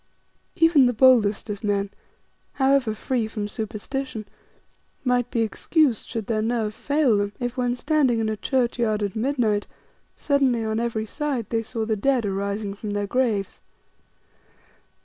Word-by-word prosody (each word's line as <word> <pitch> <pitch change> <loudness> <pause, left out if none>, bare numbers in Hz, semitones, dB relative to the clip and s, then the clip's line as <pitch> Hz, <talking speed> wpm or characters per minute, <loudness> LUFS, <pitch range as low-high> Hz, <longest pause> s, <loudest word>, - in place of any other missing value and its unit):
Even 325 -6 +5
the 245 - +1
boldest 230 -4 +4
of 210 0 -5
men, 200 -1 0 0.6
however 265 -5 +2
free 235 0 -1
from 215 -2 -4
superstition, 220 +3 -5 0.8
might 250 -1 +1
be 230 - 0
excused 240 - +1
should 225 -2 -4
their 215 0 0
nerve 220 -1 -1
fail 285 -3 +2
them 205 0 -1
if, 245 -1 -3
when 245 -1 0
standing 270 -3 +2
in 220 - 0
a 215 - -1
churchyard 235 -3 0
at 200 -2 -3
midnight, 225 -4 0 0.5
suddenly 270 -5 +1
on 220 0 -1
every 230 -2 -2
side 275 -3 -3
they 225 -1 +1
saw 225 0 -4
the 220 0 0
dead 250 +2 +1
arising 200 +1 -2
from 210 +1 -7
their 205 0 -1
graves. 210 -4 -1
230 Hz, 150 wpm, -24 LUFS, 210-260 Hz, 0.8 s, Even